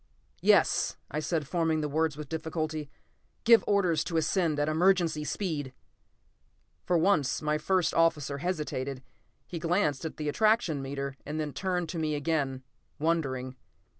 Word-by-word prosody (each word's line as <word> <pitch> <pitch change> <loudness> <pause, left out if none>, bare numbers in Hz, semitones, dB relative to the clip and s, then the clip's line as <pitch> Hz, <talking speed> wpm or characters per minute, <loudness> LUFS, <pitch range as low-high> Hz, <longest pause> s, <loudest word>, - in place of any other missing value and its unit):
"Yes," - - +3
I 150 - -1
said, 155 -1 -1
forming 160 -1 +1
the 150 - -1
words 155 0 0
with 150 -2 -6
difficulty. 155 -1 -3 0.5
"Give 230 -1 +7
orders 185 -6 +2
to 165 - -2
ascend 160 -1 +1
at 145 - +1
emergency 165 -1 +2
speed!" 150 -6 -3 1.1
For 180 - +3
once 160 -6 +2
my 150 0 0
first 180 +1 +1
officer 150 -4 +2
hesitated. 140 -6 -3 0.4
He 170 - -6
glanced 165 -4 +1
at 160 - -5
the 150 - -3
attraction 210 -4 +2
meter 140 0 -4
and 150 +2 -4
then 150 -2 -3
turned 180 -3 -1
to 165 - -3
me 155 -1 0
again, 140 -3 -1 0.3
wondering. 135 -5 -1
155 Hz, 145 wpm, -29 LUFS, 145-170 Hz, 1.1 s, Give